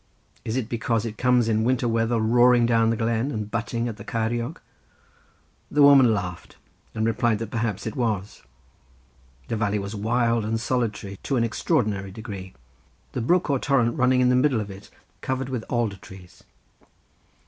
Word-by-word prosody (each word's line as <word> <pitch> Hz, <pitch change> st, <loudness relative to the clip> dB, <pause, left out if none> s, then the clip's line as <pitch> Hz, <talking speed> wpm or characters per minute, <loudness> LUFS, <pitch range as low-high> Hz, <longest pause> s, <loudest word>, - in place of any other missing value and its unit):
"Is 110 Hz, +3 st, -2 dB
it 125 Hz, -4 st, -2 dB
because 115 Hz, -1 st, -1 dB
it 110 Hz, -2 st, -6 dB
comes 125 Hz, -2 st, +3 dB
in 110 Hz, -1 st, +1 dB
winter 125 Hz, +1 st, +1 dB
weather 115 Hz, 0 st, +1 dB
roaring 120 Hz, +2 st, +4 dB
down 115 Hz, -1 st, +3 dB
the 115 Hz, -, 0 dB
glen 115 Hz, +3 st, 0 dB
and 110 Hz, -5 st, -4 dB
butting 115 Hz, +1 st, -2 dB
at 110 Hz, -3 st, -5 dB
the 100 Hz, -, -9 dB
Ceiriog?" 115 Hz, +5 st, -2 dB, 1.1 s
The 145 Hz, 0 st, +3 dB
woman 135 Hz, -4 st, +7 dB
laughed, 90 Hz, -5 st, -4 dB, 0.4 s
and 110 Hz, 0 st, 0 dB
replied 115 Hz, -1 st, +1 dB
that 110 Hz, 0 st, -6 dB
perhaps 115 Hz, -4 st, -2 dB
it 110 Hz, -, -4 dB
was. 110 Hz, -5 st, -2 dB, 1.1 s
The -, -, -2 dB
valley 105 Hz, -1 st, 0 dB
was 100 Hz, +1 st, -5 dB
wild 115 Hz, +2 st, +1 dB
and 110 Hz, +1 st, -1 dB
solitary 110 Hz, -5 st, -2 dB
to 135 Hz, -, -2 dB
an 115 Hz, -, +2 dB
extraordinary 110 Hz, -, 0 dB
degree, 100 Hz, -2 st, -8 dB, 0.6 s
the 125 Hz, -, -3 dB
brook 175 Hz, +10 st, +2 dB
or 135 Hz, -, +1 dB
torrent 125 Hz, -5 st, +1 dB
running 130 Hz, -2 st, +3 dB
in 125 Hz, -, +4 dB
the 125 Hz, -, +3 dB
middle 130 Hz, -2 st, +2 dB
of 105 Hz, -2 st, -5 dB
it 95 Hz, +1 st, -12 dB, 0.3 s
covered 130 Hz, 0 st, -3 dB
with 125 Hz, -4 st, -3 dB
alder 115 Hz, -5 st, -1 dB
trees. 90 Hz, -1 st, -15 dB
115 Hz, 170 wpm, -24 LUFS, 105-125 Hz, 1.1 s, woman